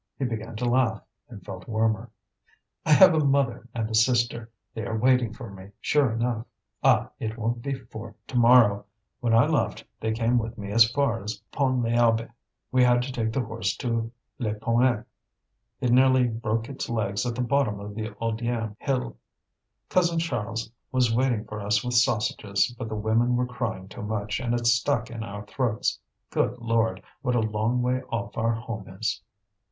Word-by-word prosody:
He 135 - -1
began 115 -1 -4
to 120 +3 -2
laugh, 120 -3 +2 0.3
and 110 -5 -11
felt 95 -2 -8
warmer. 110 +1 0 0.8
"I 155 - +6
have 185 +3 +8
a 160 - +3
mother 135 -4 +1
and 115 -2 -2
a 110 - -6
sister. 120 0 +2 0.2
They 110 - -4
are 110 +2 -2
waiting 125 -1 +3
for 115 -2 -9
me, 95 +1 -12
sure 145 -5 +2
enough. 115 0 -1 0.4
Ah! - - +4
it 110 +1 -4
won't 115 +1 -2
be 140 +2 -2
for 115 -3 -10
to - - -9
morrow. 115 -4 +5 0.3
When 115 -2 +2
I 115 - +6
left, - - 0 0.2
they 110 - -1
came 115 +2 +2
with 115 +1 -5
me 100 -1 -6
as 115 +1 +6
far 135 -4 0
as 105 +3 -4
Pont 130 -3 +1
l'Abbé. 115 0 +2 0.4
We 130 -1 +4
had 120 0 +4
to 130 - -5
take 115 -3 -1
the 130 +2 0
horse 110 -4 -2
to 115 -2 -2 0.3
Lepalmec: 115 +1 +1 0.8
it 125 - +1
nearly 130 +1 +5
broke 115 0 -2
its 135 -2 -5
legs 100 -4 -1
at 120 - -2
the 125 - -1
bottom 125 -5 +1
of 105 +1 -7
the 110 +1 -4
Audierne 115 -1 -2
Hill. 130 -2 -2 0.7
Cousin 175 -2 +2
Charles 115 -9 -2 0.2
was 125 -3 +2
waiting 120 -3 +1
for 105 0 -6
us 105 +1 +1
with 125 0 -2
sausages, 110 -2 +1
but 115 -2 -6
the 110 - -3
women 110 +3 +2
were 125 +1 +1
crying 110 -6 -4
too 95 - -9
much, 105 -1 -2
and 120 -2 -1
it 120 0 -2
stuck 120 0 +2
in 115 -1 -6
our 105 -1 -7
throats. 115 -1 -1 0.3
Good 125 - 0
Lord! 115 -5 0 0.2
what 125 -3 0
a - - +3
long 110 +3 0
way 125 +1 +1
off 115 0 -3
our 115 0 +1
home 115 -3 -6
is!" 115 0 -1
115 Hz, 185 wpm, -26 LUFS, 110-125 Hz, 0.8 s, have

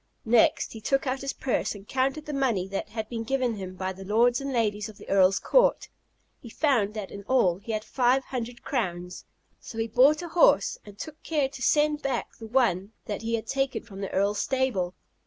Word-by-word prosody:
Next 230 0 +3
he 220 - -9
took 270 +6 +1
out 265 0 -1
his 275 0 -2
purse, 255 -4 -1
and 200 0 -12
counted 270 +3 -1
the 295 - -5
money 240 -9 0
that 195 - -4
had 220 -1 -4
been 230 -1 -4
given 250 -2 0
him 185 -1 -7
by 185 0 -3
the 190 +1 -10
lords 235 +6 +3
and 275 0 -3
ladies 210 -4 0
of 215 - -13
the - - -13
Earl's 195 0 +4
court. - - +3 0.5
He 235 - -11
found 225 -6 +1
that 210 -3 -5
in 200 - -7
all 190 -9 +3
he 215 +3 -6
had 215 0 -2
five 250 +3 +2
hundred 245 -2 -6
crowns; 180 -8 -3 0.3
so 225 - -10
he 225 - 0
bought 275 +8 +4
a 345 - -6
horse, 320 - +4
and 205 -1 -12
took 310 +5 -8
care 295 -4 0
to 265 - -10
send 300 +3 +2
back 265 -4 -3
the 225 - -8
one 220 -5 +1
that 205 -1 -4
he 230 +1 -1
had 225 - -4
taken 270 +1 -1
from 200 -3 -10
the 195 - -3
Earl's 200 +1 +1
stable. 240 -8 0
230 Hz, 215 wpm, -27 LUFS, 200-265 Hz, 0.5 s, Earl's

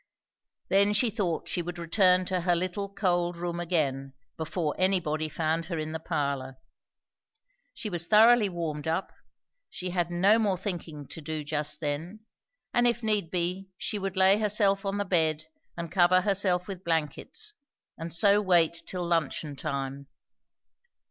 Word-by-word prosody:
Then 200 +2 +4
she 225 +2 +2
thought 190 -7 -2
she 175 - -1
would 175 +1 -6
return 180 +2 +3
to 185 -1 -1
her 175 0 +2
little 185 +3 -2
cold 175 -3 0
room 175 0 -3
again, 140 -6 -1 0.2
before 160 -1 -2
anybody 160 -5 +1
found 160 +1 -1
her 170 -2 -3
in 155 0 -3
the 160 - -4
parlour. 140 -4 -3 1.2
She - - -4
was 175 -4 -3
thoroughly 220 0 +6
warmed 160 -4 -4
up, 165 +4 -2 0.6
she 180 0 -5
had 175 -1 -1
no 190 +6 +4
more 200 -4 +1
thinking 170 -6 -5
to 165 - -8
do 155 0 -4
just 150 +1 -2
then; 160 +8 -4 0.5
and 240 0 +4
if 235 0 0
need 210 -6 +1
be 180 +2 -1
she 210 0 -3
would 195 -1 -4
lay 190 +2 +5
herself 205 -2 +1
on 195 +1 -1
the 205 - -1
bed 160 -4 +2 0.3
and 170 -2 -5
cover 185 0 +4
herself 185 -2 +1
with 190 -2 -7
blankets, 170 - 0 0.4
and 165 +1 -7
so 200 +5 +4
wait 170 -4 +2
till 180 -2 -3
luncheon 160 -3 -1
time. 140 -1 -4
175 Hz, 155 wpm, -28 LUFS, 160-195 Hz, 1.2 s, thoroughly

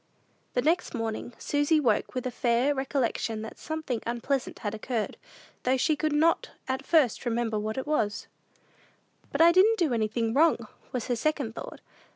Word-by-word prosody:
The 245 - +2
next 320 -1 +1
morning, 225 +1 -3
Susy 290 +2 +2
woke 235 -5 +1
with 255 - -2
a 255 - -1
faint 245 +4 +2
recollection 255 -5 -1
that 220 - -9
something 315 -7 -3
unpleasant 245 +3 -2
had 205 -1 -4
occurred, 220 0 -3 0.5
though 255 +1 +2
she 305 +4 +2
could 310 +1 -1
not 315 +3 +2 0.2
at 265 0 -2
first 300 -9 +3
remember 230 -3 0
what 215 +2 -3
it 265 - -2
was. 225 -9 0 1.1
"But - - +1
I 335 +1 +8
didn't 405 +6 +5
do 330 - +1
anything 225 0 0
wrong," 320 +5 +3 0.2
was 250 -4 -2
her 245 - 0
second 275 -2 -1
thought. - - -8
255 Hz, 170 wpm, -28 LUFS, 230-300 Hz, 1.1 s, I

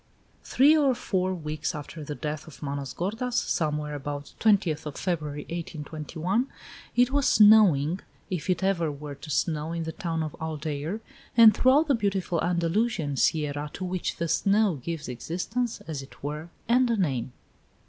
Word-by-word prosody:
XII. - - -11
Three 290 +4 +7
or 280 -4 +3
four 185 -4 -1
weeks 155 -4 -3
after 150 +1 -7
the 150 0 -5
death 150 +1 -4
of 155 - -12
Manos 140 -2 -3
gordas, 225 +7 -3
somewhere 150 -7 0
about 145 0 -5
the 220 - +4
20th 160 -6 -4
of 145 - -6
February, 150 -5 -2
1821, 165 - -3 0.5
it 245 +1 +4
was 285 -1 +2
snowing, 190 -7 +6 0.3
if 180 -4 -4
it 180 0 +1
ever 170 -5 +1
were 145 0 -7
to 140 +3 -11
snow, 155 +1 0
in 170 -1 -2
the 160 - -4
town 165 -3 -2
of 155 - -5
Aldeire, 155 +4 -3 0.4
and 225 -2 +9
throughout 280 +5 +4
the 285 - +4
beautiful 195 -6 0
Andalusian 170 -2 0
sierra 150 0 0
to 185 - -4
which 180 0 -2
the 170 - -2
snow 200 0 +2
gives 165 -3 -4
existence, 185 - -3
as 155 -4 -5
it 135 - -15
were, 150 +3 -4 0.2
and 245 +2 +4
a 230 - +1
name. 135 - -1
165 Hz, 170 wpm, -27 LUFS, 150-200 Hz, 0.5 s, and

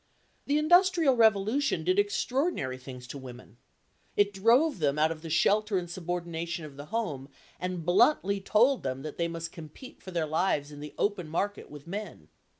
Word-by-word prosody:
The 290 - +2
industrial 340 -2 +4
revolution 220 - +2
did 185 +4 +2
extraordinary 205 - -1
things 125 -1 -10
to 140 +2 -8
women. 125 -3 -12 0.6
It 205 0 +3
drove 235 - +3
them 145 -2 +1
out 155 +1 +3
of 160 -1 -6
the 165 - -7
shelter 210 +5 +2
and 175 -1 -3
subordination 170 -1 -4
of 145 -2 -11
the 145 +1 -9
home 150 -12 -3 0.3
and 180 -2 -4
bluntly 200 - +3
told 240 +7 +3
them 130 0 -4
that 155 - -7
they 170 - 0
must 165 0 -5
compete 165 - -12
for - - -10
their 170 -3 -1
lives 155 -2 0
in 145 - -10
the 150 0 -9
open 195 -6 -1
market 200 +6 -2
with 145 0 -11
men. 185 - -7
175 Hz, 175 wpm, -29 LUFS, 150-215 Hz, 0.6 s, industrial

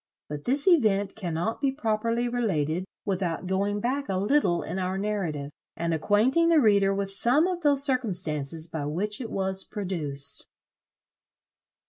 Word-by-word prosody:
But 145 0 -6
this 275 +5 +1
event 210 - +3
cannot 180 - -3
be 275 -2 +2
properly 230 -2 0
related 185 -9 -1 0.2
without 185 -3 -2
going 200 +2 0
back 265 +5 -2
a 190 - 0
little 200 -3 +2
in 180 +4 -4
our 185 +1 -1
narrative, 180 -9 -2 0.3
and 170 0 -1
acquainting 230 - +3
the 330 -2 +6
reader 200 -5 +4
with 195 0 -2
some 245 - +3
of 360 -1 -2
those 285 -3 +3
circumstances 170 - 0
by 160 -3 -4
which 205 - -2
it 230 - -5
was 190 0 -1
produced. 160 -9 -3
200 Hz, 145 wpm, -27 LUFS, 175-240 Hz, 0.3 s, the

